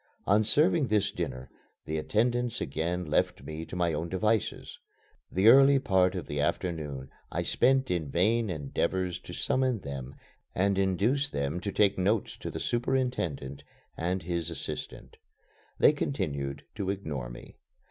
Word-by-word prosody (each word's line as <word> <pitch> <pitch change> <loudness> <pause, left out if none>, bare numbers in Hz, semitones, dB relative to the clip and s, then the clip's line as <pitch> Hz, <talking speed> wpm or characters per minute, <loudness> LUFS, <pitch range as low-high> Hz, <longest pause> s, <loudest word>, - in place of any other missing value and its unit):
On 105 +3 +4
serving 150 - +3
this 105 -2 +2
dinner, 65 -7 -4 0.4
the 80 0 -2
attendants 120 +6 0
again 85 +5 -2
left 75 - 0
me 80 +1 -6
to - - -7
my 85 -2 +1
own 80 +3 -3
devices. 105 +4 -1 0.5
The 95 +4 +3
early 135 +3 +8
part 95 -7 +2
of 90 - -4
the 75 - -4
afternoon 75 -5 -2 0.2
I - - -1
spent 130 -2 +2
in 80 -5 -1
vain 110 +8 +2
endeavors 90 +4 -1
to - - -11
summon 130 -5 0
them 70 -2 -6 0.4
and 100 +1 +2
induce 105 +10 +1
them 70 - -2
to 100 +2 -3
take 100 -1 +3
notes 100 +3 +1
to - - -6
the - - -5
superintendent 120 - -1 0.3
and 90 +1 -2
his 85 -1 -2
assistant. 85 - -4 0.6
They - - +6
continued 70 - -3
to 100 -3 -2
ignore 75 -11 -3
me. - - -12
95 Hz, 145 wpm, -29 LUFS, 80-115 Hz, 0.6 s, early